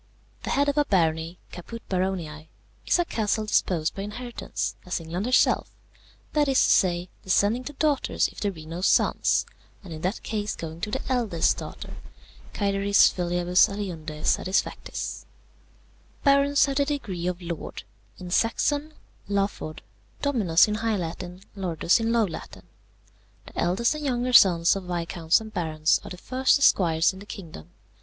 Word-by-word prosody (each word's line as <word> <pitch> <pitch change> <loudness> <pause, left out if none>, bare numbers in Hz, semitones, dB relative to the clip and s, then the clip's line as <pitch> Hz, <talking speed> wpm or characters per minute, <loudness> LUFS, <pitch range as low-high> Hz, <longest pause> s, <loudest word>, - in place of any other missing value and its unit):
The - - -5
head 285 +1 +2
of 285 +1 +1
a 295 - +3
barony 165 - 0
(Caput 230 +6 -9
baroniæ) 180 -5 -3 0.4
is - - +4
a 350 - +1
castle 215 -5 -1
disposed 170 -6 +1
by 195 - -6
inheritance, 235 +4 -5
as 180 - -3
England 170 +6 -4
herself, 255 - +3 0.6
that 295 -1 +2
is 270 -1 +3
to - - +4
say, 175 -1 +2
descending 205 +6 +1
to 290 - -6
daughters 290 -1 +1
if - - -12
there 205 - 0
be 160 -4 -11
no 165 +3 -6
sons, 190 - +2 0.4
and 175 -4 -8
in 155 - -8
that 185 +5 -2
case 210 -1 -3
going 165 0 -7
to - - -2
the - - -3
eldest 230 -10 +1
daughter, - - -8 0.6
cæteris 200 0 +3
filiabus 175 0 +3
aliundè 165 -7 -6
satisfactis. 185 +1 -1 1.0
"Barons 280 0 +4
have 275 -1 -2
the 285 - +3
degree 205 - -3
of 180 -1 -2
lord: 170 -3 -6 0.3
in 180 -1 -8
Saxon, 290 - 0 0.3
laford; 195 -6 -2 0.4
dominus 215 - +4
in 210 - -1
high 225 -2 +1
Latin; 180 +1 -6
Lordus 180 0 +1
in 225 0 0
low 230 -2 +3
Latin. 175 - -8 0.8
The - - -8
eldest 190 - +2
and 305 0 -6
younger 250 -2 -1
sons 175 -6 +6
of 195 -2 -5
viscounts 170 -1 +1
and 220 -1 -10
barons 155 -2 +1
are - - -8
the 180 - -8
first 255 +7 +2
esquires 170 -11 +3
in 190 - -11
the 205 - -12
kingdom. 165 - -9
195 Hz, 160 wpm, -25 LUFS, 170-235 Hz, 1.0 s, sons